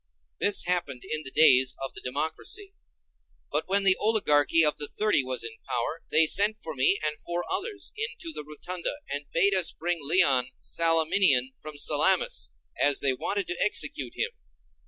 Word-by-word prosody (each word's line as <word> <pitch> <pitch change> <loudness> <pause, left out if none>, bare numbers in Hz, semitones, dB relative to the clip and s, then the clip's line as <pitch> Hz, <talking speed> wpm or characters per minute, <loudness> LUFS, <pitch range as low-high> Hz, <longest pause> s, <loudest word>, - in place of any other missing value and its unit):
This 205 - +3
happened 170 -8 -2
in 155 - -3
the 140 - -6
days 130 -3 +5
of - - -9
the - - -7
democracy. 160 - -4 0.8
But - - -2
when 200 +1 +2
the 190 -1 +7
oligarchy 165 -7 +2
of 150 - +1
the 145 - -1
Thirty 210 -7 0
was 130 -1 -3
in 115 -1 -5
power, 125 +7 -3
they 160 - +6
sent 205 +6 +2
for 160 -7 -8
me 135 +8 +2
and 150 0 -3
four 175 0 -4
others 415 -1 -4
into 440 -7 -5
the - - -6
rotunda, 170 - -6 0.2
and 145 0 -5
bade 200 +4 +2
us 185 -3 +2
bring 175 +1 -3
Leon 140 -5 +3
the 130 - -16
Salaminian 165 -5 +3
from 155 -1 -9
Salamis, 190 - +1 0.3
as 145 -1 +3
they 135 -2 +2
wanted 200 +9 -3
to 175 - -5
execute 210 - -2
him. 480 - -2
160 Hz, 175 wpm, -26 LUFS, 145-195 Hz, 0.8 s, the